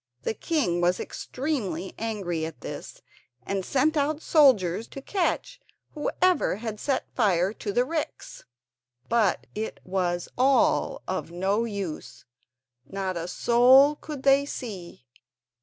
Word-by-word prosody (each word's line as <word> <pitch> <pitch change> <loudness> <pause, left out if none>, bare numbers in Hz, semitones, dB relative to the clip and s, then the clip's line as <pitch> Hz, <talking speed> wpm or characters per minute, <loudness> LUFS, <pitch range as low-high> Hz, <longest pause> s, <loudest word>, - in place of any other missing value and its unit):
The - - -1
king 220 - 0
was 175 +1 +2
extremely 205 - -4
angry 195 -7 -2
at 160 -5 -6
this, - - -8 0.4
and 195 -1 -2
sent 290 - +1
out 295 +1 +1
soldiers 230 - +3
to - - -9
catch 390 - -2 0.3
whoever 360 - +1
had 215 0 -5
set 270 +2 -1
fire 195 -4 +2
to 210 - -5
the 245 +5 +2
ricks; 310 +1 -5 0.7
but 230 -4 +2
it 220 +1 -4
was 180 -2 -1
all 265 +1 +3
of - - -3
no 195 +6 0
use—not 200 -8 -6 0.9
a 170 0 -4
soul 255 +8 +5
could 295 -2 -8
they 275 0 +5
see. 195 - -7
225 Hz, 125 wpm, -26 LUFS, 185-275 Hz, 0.9 s, soul